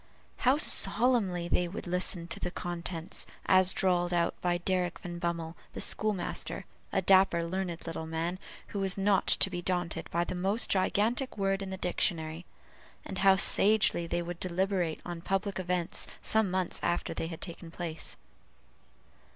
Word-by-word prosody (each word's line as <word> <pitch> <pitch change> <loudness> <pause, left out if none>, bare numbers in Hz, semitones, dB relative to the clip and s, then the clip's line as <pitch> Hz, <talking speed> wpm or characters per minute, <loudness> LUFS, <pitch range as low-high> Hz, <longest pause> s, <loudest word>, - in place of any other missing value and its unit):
How 260 +2 +3
solemnly 220 - +3
they 175 0 +1
would 180 - -7
listen 180 -1 -1
to - - -5
the - - -2
contents, 175 -1 -4 0.2
as 185 0 +5
drawled 180 -2 +1
out 170 -1 +1
by 175 -1 +1
Derrick 180 0 -1
Van 175 -1 -7
Bummel, 170 -1 -3 0.2
the - - -6
school 215 0 +4
master, 175 - -4 0.3
a 190 - 0
dapper 185 -2 +4
learned 175 0 -4
little 165 -1 -5
man, 165 +3 -3 0.3
who 200 - -4
was 195 -1 +1
not 195 0 +2
to - - +4
be 175 -1 -3
daunted 175 -2 -2
by 170 +1 0
the - - -4
most 195 +5 +1
gigantic 220 +7 +1
word 195 0 0
in 195 - -5
the 190 - -5
dictionary; 170 -2 -2 0.6
and 190 - -5
how 195 0 +6
sagely 200 -3 +4
they 175 +1 -1
would 175 0 -6
deliberate 185 -2 -1
upon 175 -1 -7
public 195 +2 -2
events 180 +1 -1
some 220 -3 +1
months 185 -1 -1
after 175 - -1
they 165 - -3
had 165 -1 -7
taken 170 -1 -9
place. 165 -1 -5
180 Hz, 165 wpm, -30 LUFS, 170-195 Hz, 0.6 s, how